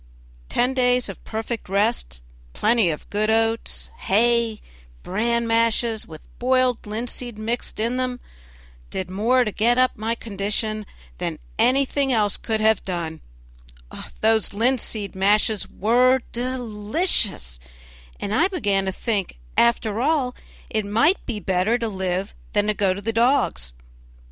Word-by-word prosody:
Ten 250 +2 +1
days 250 -1 +2
of - - -9
perfect 225 -1 -4
rest, 200 - 0 0.3
plenty 220 -4 +3
of 150 - -5
good 215 +1 0
oats, 225 +1 0
hay, 230 +1 +2 0.4
bran 235 +4 0
mashes, 230 -1 +1
with 155 -2 -11 0.2
boiled 255 -2 +2
linseed 235 +1 -3
mixed 225 +2 -3
in 235 +3 0
them, 255 -1 -2 0.7
did 185 -1 -4
more 235 +7 +3
to 215 - -2
get 235 +4 +2
up 255 0 +4
my 225 +2 -2
condition 215 0 -2 0.3
than - - -3 0.2
anything 275 +1 +2
else 210 -4 +2
could 220 -2 -2
have 220 -1 +3
done; 170 -4 -4 1.0
those 220 -2 +2
linseed 225 -3 0
mashes 205 +2 +2
were 250 +5 +3
delicious, 230 - 0 0.6
and 200 - -3
I 325 +10 +4
began 205 - 0
to 190 - -1
think, 200 - -2 0.2
after 235 -2 +2
all, 275 -3 +1 0.4
it 215 -1 0
might 230 - +2
be 225 -4 -3
better 190 +4 +1
to 230 -1 -2
live 190 -1 -2 0.2
than 205 0 +2
go 195 -2 +1
to 200 - -6
the 225 +2 -2
dogs. 230 - +2
225 Hz, 135 wpm, -23 LUFS, 205-245 Hz, 1.0 s, up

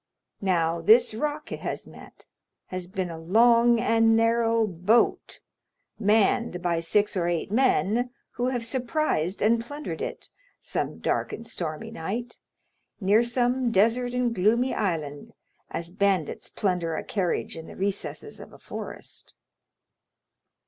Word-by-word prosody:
Now 170 -3 +1
this 225 +7 +5
rock 300 +6 -3
it - - -4
has - - -4
met - - -14 0.4
has 185 -1 -5
been 185 -1 -3
a 165 - -7
long 235 +6 +4
and 225 -1 +3
narrow 230 0 +3
boat, 195 +5 +1 0.6
manned 210 -2 +2
by 175 -2 0
six 205 +6 +1
or 175 -2 0
eight 175 +3 -2
men, 245 -1 +2 0.2
who 245 - -2
have 245 -3 -1
surprised 245 - -1
and 230 +2 +3
plundered 290 +5 -6
it, - - -5 0.3
some - - -3
dark - - -1
and 230 - -7
stormy 160 -8 -5
night, 230 +9 -5 0.6
near 205 +2 +4
some 245 +1 +1
desert 230 +4 +2
and 250 -1 +1
gloomy 230 +6 +2
island, 155 -8 -3 0.4
as 170 +1 -5
bandits 195 -4 0
plunder 180 -5 -1
a - - -3
carriage 185 -4 -2
in 160 0 -9
the - - -10
recesses 195 +1 -4
of - - -11
a - - -14
forest." - - -9
215 Hz, 135 wpm, -26 LUFS, 180-235 Hz, 0.6 s, this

